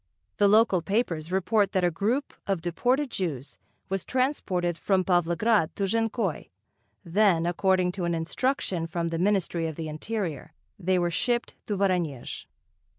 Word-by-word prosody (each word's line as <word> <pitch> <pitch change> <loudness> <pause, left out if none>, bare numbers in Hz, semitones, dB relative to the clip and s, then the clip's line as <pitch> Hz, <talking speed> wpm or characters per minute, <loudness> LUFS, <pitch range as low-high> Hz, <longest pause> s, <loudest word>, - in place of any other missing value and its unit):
The 205 - +5
local 210 -3 +4
papers 170 -4 -1
report 200 +2 +2
that 185 -2 +1
a 175 - +3
group 230 - -1
of 195 -3 0
deported 250 - 0
Jews 150 -8 -4 0.3
was 195 -1 -2
transported 195 - 0
from 190 +2 +1
Pavlograd 175 +2 +2
to 200 - -2
Jankoy, 225 -2 -1 0.6
then, 175 -2 +3
according 180 +1 +2
to 180 -1 -3
an 170 0 0
instruction 175 0 -1
from 170 0 -2
the 165 0 -3
Ministry 180 -3 +1
of 160 - -5
the 160 0 -5
Interior 165 - -4 0.3
they 185 0 +1
were 175 -1 +1
shipped 240 +6 0
to 205 - -1
Voronezh.... 175 -9 -1
185 Hz, 150 wpm, -27 LUFS, 170-210 Hz, 0.6 s, The